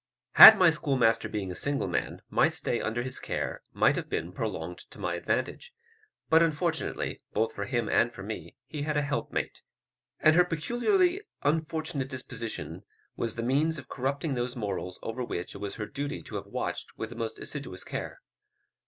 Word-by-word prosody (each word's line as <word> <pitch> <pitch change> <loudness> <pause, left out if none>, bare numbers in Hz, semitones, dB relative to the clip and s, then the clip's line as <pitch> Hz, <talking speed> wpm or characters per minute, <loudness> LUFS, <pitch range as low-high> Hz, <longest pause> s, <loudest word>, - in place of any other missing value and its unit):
Had 220 - +12
my 180 -3 +6
schoolmaster 130 -7 +2
being 100 -4 -3
a - - -4
single 140 +10 -1
man, - - -3
my - - +4
stay - - -1
under 115 +2 -1
his 130 - -3
care - - -3
might - - +3
have - - -4
been 85 +2 -2
prolonged 90 -4 -4
to - - -14
my 90 - -2
advantage; 480 - -2 0.5
but 160 +1 +5
unfortunately, 165 0 -1
both 110 +1 0
for 100 - -4
him 120 +1 -1
and 120 - +3
for 100 - -9
me, 95 -5 -7
he 150 - -6
had 150 +1 -1
a 145 - +2
helpmate, 145 0 -3 0.6
and 155 +1 +5
her 180 - +7
peculiarly 245 - +1 0.2
unfortunate 155 -2 -1
disposition 120 -3 -6 0.3
was 115 -1 -3
the 115 - -3
means 150 +6 +2
of - - -10
corrupting 140 +3 -2
those 120 -1 -2
morals 100 -5 -4
over 125 +3 -3
which 90 -7 -4
it 100 - -9
was 100 -1 -4
her 105 - -4
duty 140 +4 -5
to - - -12
have - - -4
watched - - -4
with 110 0 -5
the - - -8
most 110 -1 -4
assiduous 135 -11 -6
care. - - -6
130 Hz, 180 wpm, -29 LUFS, 110-155 Hz, 0.6 s, Had